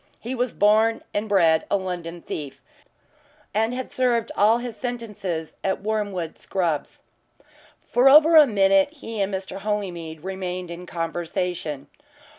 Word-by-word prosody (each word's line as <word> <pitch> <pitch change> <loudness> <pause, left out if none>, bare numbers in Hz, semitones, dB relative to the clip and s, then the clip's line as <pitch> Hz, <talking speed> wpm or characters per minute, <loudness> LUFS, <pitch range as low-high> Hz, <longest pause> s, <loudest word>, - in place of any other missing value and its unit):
He 240 +3 -5
was 250 -1 -1
born 220 +2 +3
and 210 +1 -2
bred 165 -5 +4
a - - +2
London 175 -3 -5
thief, 145 -3 -6 0.9
and 220 +2 +1
had 255 +1 -5
served 240 -3 +1
all 215 +3 +4
his 240 -2 -6
sentences 210 - -4
at 190 0 -1
Wormwood 205 -6 -2
Scrubbs. 170 -6 -2 0.9
For 250 +3 +5
over 310 +4 +7
a 305 -2 +9
minute 195 -1 +4
he 225 -8 -6
and 195 +1 0
Mr. 190 0 -5
Holymead 175 -6 -4
remained 185 -2 -4
in 175 +1 -8
conversation. 165 -3 -3
195 Hz, 135 wpm, -24 LUFS, 175-225 Hz, 0.9 s, a